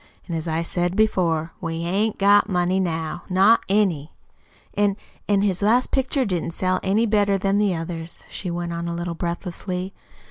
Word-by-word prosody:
An' 175 - -5
as 165 0 -3
I 160 +1 0
said 175 +1 -1
before, 170 -7 +1
we 165 -1 -3
hain't 200 +5 0
got 205 +1 +4
money 180 0 +1
now 165 -3 -2
not 195 +5 +5
any. 185 -7 +1 0.6
"An' 205 -1 +1 0.3
an' 200 -1 +3
his 190 -2 0
last 235 +5 +3
pictures 265 0 +1
didn't 175 -4 -2
sell 185 0 0
any 205 +4 +2
better 205 -2 +2
than 195 +1 +1
the 200 -3 +2
others," 165 0 -6
she 185 - -5
went 170 0 -3
on 170 0 -4
a 170 - -3
little 170 0 -3
breathlessly. 180 +2 -4
185 Hz, 175 wpm, -23 LUFS, 170-205 Hz, 0.6 s, not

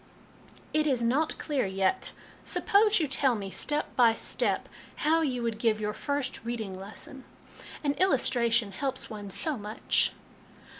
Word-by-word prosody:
" - - -26 0.3
It 310 0 +2
is 255 -4 +1
not 270 +7 +1
clear 280 -8 -1
yet; 190 0 -1 0.3
suppose 420 +1 +4
you 315 - 0
tell 265 -2 +2
me, 195 -2 -6
step 295 +8 -1
by 235 -3 +5
step, - - 0 0.4
how 325 +2 +4
you 255 -6 -1
would 230 -2 -2
give 225 -2 +1
your 210 0 -2
first 285 -2 -3
reading 225 -4 -4
lesson. 205 +8 -7 0.6
An 285 -1 +1
illustration 240 - +2
helps 265 +5 -2
one 205 -2 -7
so 290 - +2
much." 210 +1 0
240 Hz, 150 wpm, -28 LUFS, 215-290 Hz, 0.6 s, by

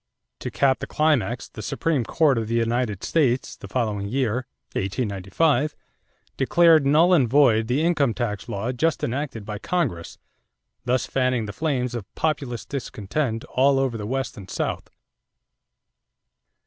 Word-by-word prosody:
To - - -4
cap 135 -2 +2
the - - -5
climax 130 -7 +1
the 110 - -9
Supreme 150 +4 0
Court 140 +1 +2
of 110 - -3
the 115 - -1
United 115 -3 0
States, 135 -6 +1
the - - -10
following 105 -5 -1
year 125 +1 -1 0.3
(1895) 115 - 0 0.6
declared 160 +1 +5
null 165 +6 +5
and 140 -8 +4
void 115 -5 +4
the 130 +6 +1
income 150 -8 +2
tax 105 -5 -3
law 110 +5 -2
just 145 +6 0
enacted 125 -4 -3
by 105 -1 -5
Congress, 120 - -2 0.7
thus 125 +1 +1
fanning 125 -3 0
the 105 - -6
flames 130 -5 -1
of 115 -5 -6
Populist 140 -7 -2
discontent 115 -1 -3
all 135 +1 +3
over 135 -3 0
the 105 -2 -4
West 135 +1 -3
and 95 -2 -10
South. - - -3
125 Hz, 145 wpm, -24 LUFS, 110-145 Hz, 0.7 s, declared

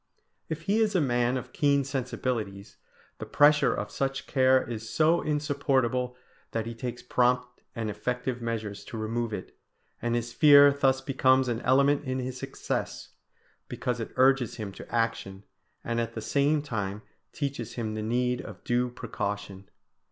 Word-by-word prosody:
If 160 0 -4
he 200 +5 +1
is 215 -3 +2
a - - +5
man 125 -3 +1
of 125 - -8
keen 140 -1 +2
sensibilities, 120 -6 -4 0.4
the - - -5
pressure 145 0 +5
of - - -3
such 135 0 -2
care 130 -1 +3
is 110 -2 -6
so 160 +2 +3
insupportable 135 -4 0 0.4
that 115 -1 -1
he 115 - -5
takes 120 +1 -6
prompt 125 0 +1
and 115 -2 -3
effective 125 +3 -3
measures 110 -3 -4
to 115 - -7
remove 115 +1 -2
it; 95 -3 -6 0.5
and 120 0 0
his 120 0 -3
fear 145 0 +8
thus 135 -1 +2
becomes 130 -1 +3
an 115 -1 -2
element 140 +3 +3
in 130 -2 -2
his 130 -1 -4
success, - - -4 0.6
because 125 -1 -3
it 115 - -5
urges 130 -1 +3
him 105 -4 -5
to - - -12
action, 115 -4 -1 0.4
and 115 0 -1
at 115 - -4
the - - -3
same 145 +5 +1
time 105 -6 -4 0.3
teaches 135 -6 -4
him 110 -3 -3
the 110 - -3
need 125 +3 0
of - - -11
due 125 +1 +1
precaution. 100 -4 -5
125 Hz, 160 wpm, -28 LUFS, 115-135 Hz, 0.6 s, fear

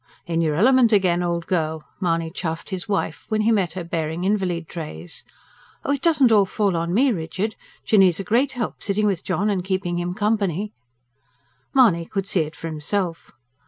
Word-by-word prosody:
"In 165 -1 0
your 155 -2 +1
element 245 - +5
again, 185 -4 +3
old 170 -1 -1
girl!" 160 -3 -1 0.2
Mahony 165 -3 0
chaffed 165 +1 -4
his 190 +2 -4
wife, 190 -6 -2
when 215 -1 +1
he 220 +2 +3
met 190 -7 +1
her 180 -1 -4
bearing 165 0 -3
invalid 185 -4 0
trays. 90 - -7 0.6
"Oh, - - +1
it 280 -1 0
doesn't 295 -8 +4
all 205 -3 +5
fall 200 -1 0
on 170 +1 -1
me, 255 +8 +3
Richard. 185 +3 -3 0.3
Jinny's 190 -5 +4
a - - -2
great 250 +8 +1
help 240 -4 -4
sitting 210 +1 0
with 195 -4 0
John 185 +3 0
and 195 -4 0
keeping 185 -2 -1
him 175 +1 -3
company." 205 -2 0 1.0
Mahony 200 -12 +4
could 195 -2 -2
see 185 - +2
it 155 0 -5
for - - -9
himself. 165 +3 -3
185 Hz, 185 wpm, -23 LUFS, 165-210 Hz, 1.0 s, element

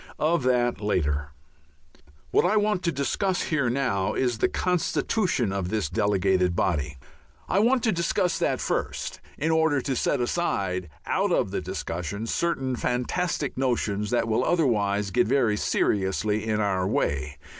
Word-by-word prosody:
Of 165 +2 +1
that 120 -2 +1
later. 75 -8 0 1.0
What - - +4
I 215 - +3
want 210 -3 +1
to 170 - +2
discuss 180 +6 -1
here 145 -6 0
now 105 -6 0
is 120 -4 0
the - - +2
constitution 180 - 0
of 95 -2 -2
this 105 -7 -1
delegated 95 -4 +2
body. 75 -4 -1 0.5
I 190 - +2
want 245 +3 +3
to 225 - +3
discuss 170 0 0
that - - 0
first - - -3 0.2
in 160 +3 0
order 160 -3 +3
to 135 +1 -2
set - - 0
aside 95 - -1 0.2
out - - 0
of - - +1
the - - -2
discussion 90 +6 -4
certain 135 -1 -1
fantastic 135 +5 -1
notions 105 -5 0
that 120 -1 +1
will 115 +3 +1
otherwise 105 - +1
get 95 - +2
very 120 -4 +2
seriously 105 +1 0
in 110 -1 0
our 95 -3 0
way. 70 -4 -1
115 Hz, 150 wpm, -26 LUFS, 100-155 Hz, 1.0 s, What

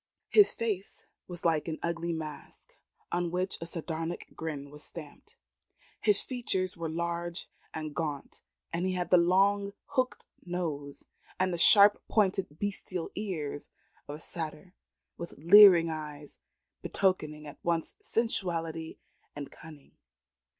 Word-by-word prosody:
His 415 -2 +6
face 210 -4 -3 0.2
was 175 -1 -6
like 160 -2 +2
an 160 -1 -3
ugly 170 0 -1
mask, 155 -3 -7 0.4
on 175 0 0
which 180 +2 -2
a 165 - -5
sardonic 165 0 -4
grin 145 -3 -5
was 150 0 -9
stamped. 155 -4 -9 0.6
His 210 -2 +6
features 190 -8 -2
were 165 -2 -4
large 170 +1 -3 0.2
and 155 -1 -5
gaunt, 150 -4 -4 0.3
and 175 +2 0
he 185 - 0
had 180 -1 -3
the 180 - +8
long, 200 +3 +3 0.2
hooked 255 -3 -1 0.2
nose, 160 -6 -4 0.3
and 185 -1 +1
the - - -1
sharp 205 +3 +7
pointed 190 -7 +1
bestial 190 -3 -3
ears 160 -9 -4 0.4
of 145 - -5
a - - -10
satyr, 165 +2 -6 0.5
with 170 - -6
leering 170 0 +8
eyes 150 -2 -7 0.4
betokening 155 -6 0
at 145 - -10
once 170 -1 0
sensuality 170 - -1 0.4
and 145 -1 -7
cunning. 150 -3 -14
170 Hz, 130 wpm, -30 LUFS, 155-185 Hz, 0.6 s, the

